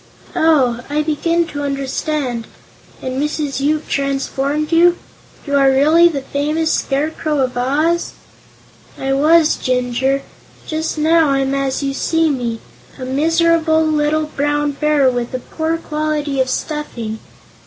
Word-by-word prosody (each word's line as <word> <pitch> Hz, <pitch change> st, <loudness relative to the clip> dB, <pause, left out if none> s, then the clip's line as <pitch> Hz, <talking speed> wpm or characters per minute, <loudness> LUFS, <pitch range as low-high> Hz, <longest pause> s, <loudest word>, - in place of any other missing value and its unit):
"Oh; 300 Hz, -8 st, +3 dB
I 300 Hz, +1 st, 0 dB
begin 335 Hz, +3 st, 0 dB
to 290 Hz, -, -5 dB
understand. 275 Hz, -3 st, -2 dB, 0.6 s
And 260 Hz, +1 st, -2 dB
Mrs. 295 Hz, -2 st, -2 dB
Yoop 300 Hz, +2 st, 0 dB
transformed 275 Hz, +2 st, -1 dB
you? 345 Hz, +1 st, +5 dB, 0.5 s
You 285 Hz, -2 st, -1 dB
are 275 Hz, -1 st, +5 dB
really 305 Hz, +6 st, +5 dB
the 285 Hz, -5 st, -2 dB
famous 305 Hz, +4 st, -1 dB
Scarecrow 300 Hz, +2 st, -1 dB
of 255 Hz, -2 st, 0 dB
Oz." 300 Hz, +7 st, 0 dB, 0.8 s
"I 270 Hz, 0 st, -1 dB
was, 310 Hz, +3 st, +4 dB
Jinjur. 255 Hz, +2 st, 0 dB, 0.4 s
Just 315 Hz, 0 st, -3 dB
now 320 Hz, 0 st, +3 dB
I'm 275 Hz, 0 st, +1 dB
as 275 Hz, 0 st, -1 dB
you 275 Hz, 0 st, -1 dB
see 325 Hz, +2 st, +1 dB
me 235 Hz, -4 st, -3 dB, 0.4 s
a 255 Hz, -, -6 dB
miserable 320 Hz, +3 st, +2 dB
little 305 Hz, 0 st, +1 dB
Brown 290 Hz, +1 st, 0 dB
Bear 295 Hz, -1 st, +2 dB
with 245 Hz, 0 st, -1 dB
a -, -, -2 dB
poor 320 Hz, +5 st, -3 dB
quality 300 Hz, -3 st, -2 dB
of 260 Hz, -, 0 dB
stuffing. 240 Hz, -7 st, -4 dB
290 Hz, 130 wpm, -17 LUFS, 270-315 Hz, 0.8 s, you